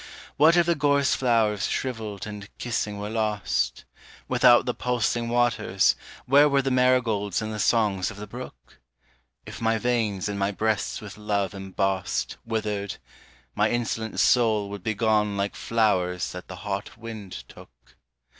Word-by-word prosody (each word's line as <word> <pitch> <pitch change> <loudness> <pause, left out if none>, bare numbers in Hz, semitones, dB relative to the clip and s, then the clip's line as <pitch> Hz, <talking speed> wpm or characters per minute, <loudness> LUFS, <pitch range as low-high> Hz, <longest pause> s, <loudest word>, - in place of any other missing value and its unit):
What 160 +4 +5
if 175 - +5
the 170 - +3
gorse 145 -2 +2
flowers 110 -5 +2
shrivelled 110 -6 -3
and 105 -1 -8
kissing 105 -4 -2
were 105 +1 -5
lost? 105 - -1 0.4
Without 125 -1 +5
the 125 - -1
pulsing 120 -1 -1
waters, 120 -5 +2 0.3
where 145 +3 +6
were 140 -1 +2
the 135 - 0
marigolds 120 -6 +2
and 110 0 -4
the 105 - -5
songs 105 -5 +2
of 110 - -10
the 105 - -6
brook? 100 - -11 0.7
If - - -9
my 115 0 +2
veins 110 -5 0
and 100 -1 -3
my 100 0 +1
breasts 110 +1 -1
with 105 0 -10
love 100 -2 -1
embossed 95 -1 -2
Withered, 105 -3 -2 0.6
my 105 +8 +2
insolent 115 -1 -2
soul 110 -5 +3
would 100 -1 -6
be 110 +3 -2
gone 105 -2 +1
like 100 +1 -2
flowers 90 -6 0
that 90 0 -8
the 90 - -8
hot 100 +1 -4
wind 110 - -8
took. - - -17
110 Hz, 155 wpm, -25 LUFS, 100-120 Hz, 0.7 s, where